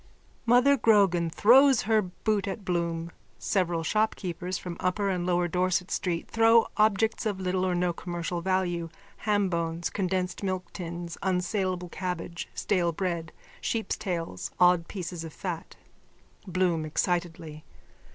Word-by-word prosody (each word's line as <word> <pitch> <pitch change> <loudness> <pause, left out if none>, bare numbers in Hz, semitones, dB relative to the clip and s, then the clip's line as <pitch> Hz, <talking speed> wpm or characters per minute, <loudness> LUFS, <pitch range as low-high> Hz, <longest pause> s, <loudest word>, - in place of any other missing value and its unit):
_(Mother 250 +2 +5
Grogan 195 -6 +4
throws 260 - +6
her 220 +1 +3
boot 200 +2 -2
at 195 +1 -5
Bloom. 170 -2 -1 0.3
Several 175 -4 0
shopkeepers 185 -3 -1
from 175 -2 -6
upper 195 +2 0
and 180 -2 -1
lower 175 -1 +2
Dorset 180 +1 0
street 170 -3 -1
throw 225 0 +5
objects 220 +1 +2
of 200 -3 -2
little 185 0 0
or 185 -1 +1
no 175 0 +1
commercial 175 0 -4
value, 175 -2 0 0.4
hambones, 170 -5 0
condensed 185 -1 -1
milk 185 -2 -3
tins, 170 -1 -6
unsaleable 185 -1 -1
cabbage, 180 -2 -4
stale 175 -4 +1
bread, 170 -1 -3 0.3
sheep's 225 -1 -1
tails, 165 - -4
odd 180 -2 +5
pieces 175 -3 -5
of 160 -2 -8
fat.)_ 175 -4 -5 0.8
BLOOM: 175 -3 +1
_(Excitedly.) 165 -1 -2
180 Hz, 130 wpm, -28 LUFS, 170-195 Hz, 0.8 s, throws